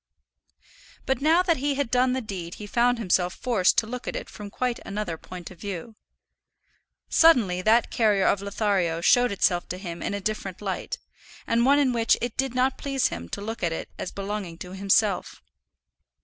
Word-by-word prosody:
But 265 +1 0
now 325 +5 +4
that 340 -3 +2
he 280 +1 0
had 280 -4 -2
done 250 0 +3
the 260 - -1
deed 185 -6 -6
he 210 - -8
found 240 +3 +2
himself 180 -4 +1
forced 225 -8 +2
to - - +3
look 245 +2 -7
at - - -3
it - - -6
from 210 -1 -8
quite 245 +3 -2
another 200 -4 -4
point 175 +2 -10
of 180 - -14
view. 200 +2 -6 1.1
Suddenly 230 - +4
that 220 +4 +3
character 210 -4 +2
of 200 - +2
Lothario 200 -5 0
showed 245 +6 +4
itself 180 -3 +1
to 180 - -4
him 175 -3 -7
in 200 - -2
a - - -3
different 195 -2 -4
light, 195 -3 -4 0.5
and 235 +2 +2
one 280 +1 +6
in 275 -4 +3
which 230 -1 +3
it 240 -2 -3
did 270 -2 -1
not 255 +1 +1
please 275 -2 0
him 85 0 -7
to - - -5
look 225 +3 -5
at 170 - 0
it 165 - -5
as - - -4
belonging 195 -4 -5
to 180 +1 -8
himself. 195 +1 +1
210 Hz, 190 wpm, -25 LUFS, 185-245 Hz, 1.1 s, one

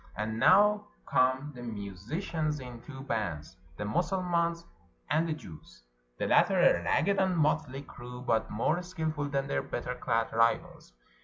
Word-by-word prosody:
And 110 +1 -2
now 210 - +5 0.2
come 130 +3 +2
the 125 - -10
musicians 120 - -3
in 125 -3 -9
two 135 0 -9
bands, 95 - -3 0.2
the - - -3
Mussulmans', 170 - 0 0.5
and 160 +3 +2
the - - +1
Jews'; 80 - -12 0.3
the - - -1
latter - - +4
a 85 - +5
ragged 195 - +2
and 190 -2 +2
motley 140 -3 +1
crew, 125 -2 -10
but 110 -3 +1
more 115 +11 0
skillful 160 -5 -3
than 140 -1 0
their 70 - -1
better - - -4
clad 115 0 -1
rivals. 115 - +1
135 Hz, 150 wpm, -30 LUFS, 115-170 Hz, 0.5 s, now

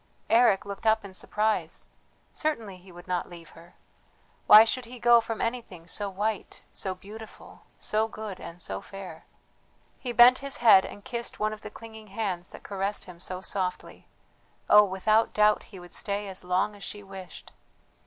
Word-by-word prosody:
Eric 225 -4 +5
looked 200 +2 -5
up 220 -1 +3
in 195 - -10
surprise; 215 +3 -1 0.4
certainly 230 -11 -2
he 185 +1 -16
would 175 0 -13
not 180 -1 -2
leave 170 -2 -12
her! 170 +1 -17 0.7
Why 215 +1 +11
should 245 +2 -2
he 250 +2 -10
go 240 0 +6
from 225 -1 -5
anything 230 -8 -4
so 200 +4 -3
white, 205 +2 -3
so 190 -1 -3
beautiful, 210 +4 -12
so 215 +1 0
good, 215 -4 -7
and 170 - -9
so 95 - -3
fair. 195 -2 -10 0.7
He 250 - -4
bent 240 +2 +7
his 275 0 -4
head 215 -5 +7
and 205 - -10
kissed 235 -1 -5
one 215 0 0
of 215 - -10
the - - -8
clinging 220 -1 -11
hands 195 -4 -3
that - - -12
caressed 200 +1 -2
him 180 -3 -12
so 185 +1 -6
softly; 185 -2 -4 0.6
oh, 210 0 +8
without 215 +4 +1
doubt 210 0 +4
he 195 - -11
would 175 0 -13
stay 205 0 -2
as 190 -1 -5
long 180 +3 0
as 200 - -15
she 205 +1 -6
wished! 190 -2 -11
205 Hz, 175 wpm, -27 LUFS, 185-220 Hz, 0.7 s, Why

